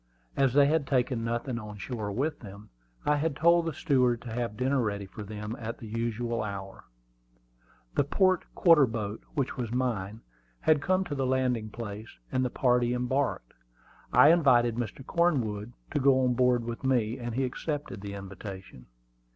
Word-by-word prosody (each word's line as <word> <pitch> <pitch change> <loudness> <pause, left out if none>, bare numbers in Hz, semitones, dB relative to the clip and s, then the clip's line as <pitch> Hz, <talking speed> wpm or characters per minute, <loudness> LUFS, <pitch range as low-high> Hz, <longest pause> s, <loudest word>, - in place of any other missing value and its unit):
As 135 -2 +2
they 145 -1 +7
had 150 -1 +1
taken 125 -3 +1
nothing 120 +1 -2
on 105 -2 -8
shore 105 0 -4
with 145 +9 -1
them, 100 -1 -12 0.3
I 150 0 +3
had 150 0 -1
told 170 +2 +4
the 165 - -2
steward 125 -6 +2
to 120 -2 -6
have 115 -3 -3
dinner 130 +2 +1
ready 100 -3 -2
for 95 +3 -10
them 105 +2 -6
at 115 0 -5
the - - -10
usual 115 +1 -2
hour. 100 -2 -6 1.1
The - - +3
port 185 +5 +2
quarter 165 -6 +6
boat, 110 -2 -4
which 140 -3 -1
was 120 -3 -3
mine, 115 -4 -2 0.4
had 155 -2 +3
come 185 +3 +2
to 175 -5 -5
the 135 -2 -1
landing 125 -4 0
place, 110 -1 -8
and 130 -1 +1
the 125 - 0
party 125 -1 +2
embarked. 125 - -1 0.6
I 145 - +7
invited 130 -8 +5
Mr. 120 +2 -5
Cornwood 120 - 0 0.2
to 150 - 0
go 135 -1 +4
on 125 - +2
board 125 -1 +2
with 115 +2 -6
me, 125 -2 +1
and 120 -1 -4
he 135 - +1
accepted 145 -4 -4
the 100 0 -6
invitation. 95 - -9
120 Hz, 175 wpm, -29 LUFS, 110-135 Hz, 1.1 s, they